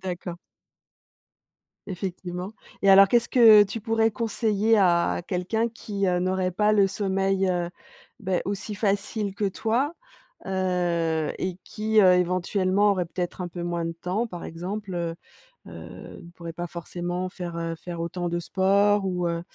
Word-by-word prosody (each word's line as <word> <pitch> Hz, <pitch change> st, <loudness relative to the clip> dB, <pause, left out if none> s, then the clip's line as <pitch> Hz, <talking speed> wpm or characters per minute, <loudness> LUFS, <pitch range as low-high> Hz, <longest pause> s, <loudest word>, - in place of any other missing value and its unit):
D'accord. 175 Hz, -1 st, -5 dB, 1.5 s
Effectivement 185 Hz, 0 st, -5 dB, 0.3 s
et 200 Hz, -, +2 dB
alors 195 Hz, 0 st, +8 dB
qu'est-ce 235 Hz, +1 st, +2 dB
que 220 Hz, -4 st, +8 dB
tu 205 Hz, +3 st, -3 dB
pourrais 225 Hz, 0 st, +2 dB
conseiller 220 Hz, -1 st, +1 dB
à 175 Hz, -3 st, +3 dB
quelqu'un 210 Hz, +6 st, -1 dB
qui, 205 Hz, -3 st, -3 dB
heu, 180 Hz, -1 st, +2 dB
n'aurait 185 Hz, 0 st, 0 dB
pas 210 Hz, +4 st, +2 dB
le 200 Hz, -2 st, +5 dB
sommeil, 195 Hz, -1 st, 0 dB
heu, 175 Hz, -1 st, -1 dB, 0.5 s
beh, 190 Hz, -3 st, -1 dB
aussi 205 Hz, +1 st, -3 dB
facile 200 Hz, 0 st, -1 dB
que 205 Hz, -, -2 dB
toi? 235 Hz, -, -1 dB, 0.5 s
Heu, 175 Hz, -4 st, 0 dB
et 185 Hz, 0 st, -3 dB
qui, 215 Hz, 0 st, +1 dB
heu, 185 Hz, -2 st, +7 dB
éventuellement, 185 Hz, +3 st, +2 dB
aurait 180 Hz, -2 st, -1 dB
peut-être 180 Hz, +1 st, -4 dB
un 175 Hz, -, -4 dB
peu 175 Hz, 0 st, -7 dB
moins 170 Hz, -1 st, -2 dB
de 165 Hz, -, -3 dB
temps 185 Hz, +7 st, -2 dB
par 175 Hz, -5 st, -8 dB
exemple, 190 Hz, +3 st, -5 dB
heu 170 Hz, -1 st, -2 dB, 0.5 s
heu, -, -, -10 dB
ne 170 Hz, -, -13 dB
pourrait 170 Hz, -1 st, -7 dB
pas 175 Hz, +1 st, -5 dB
forcément 175 Hz, +2 st, -4 dB
faire, 175 Hz, -2 st, -7 dB
heu, 165 Hz, 0 st, -3 dB
faire 170 Hz, 0 st, -7 dB
autant 175 Hz, +1 st, -3 dB
de 170 Hz, 0 st, -1 dB
sport 200 Hz, +3 st, +2 dB
ou 180 Hz, -2 st, -1 dB
heu, 170 Hz, 0 st, -2 dB
185 Hz, 155 wpm, -25 LUFS, 175-205 Hz, 1.5 s, alors